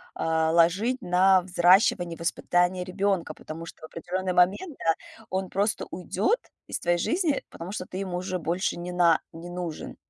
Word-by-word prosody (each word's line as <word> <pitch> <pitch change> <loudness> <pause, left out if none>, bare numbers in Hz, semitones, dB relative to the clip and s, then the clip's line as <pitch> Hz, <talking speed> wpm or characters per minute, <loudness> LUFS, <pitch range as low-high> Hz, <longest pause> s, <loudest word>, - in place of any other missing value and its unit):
а, 160 0 +1
ложить 190 +10 +3
на 185 0 +4
взращивание, 175 -1 +3
воспитание 175 +2 +1
ребёнка, 190 -3 -1
потому 165 +2 -8
что 165 - -12
в - - -8
определённый 185 +3 -3
момент, 195 - +2
да, 165 -1 +1 0.3
он 190 0 -2
просто 200 +2 0
уйдёт 195 - 0 0.3
из - - -3
твоей 175 0 +1
жизни, 330 - 0
потому 170 +3 -8
что 185 -3 -4
ты 185 - -8
ему 185 -2 -3
уже 185 0 -3
больше 175 +3 -1
не 175 +1 -5
на 170 -2 +4
не 170 +2 -9
нужен. 175 -3 -6
180 Hz, 165 wpm, -26 LUFS, 170-190 Hz, 0.3 s, на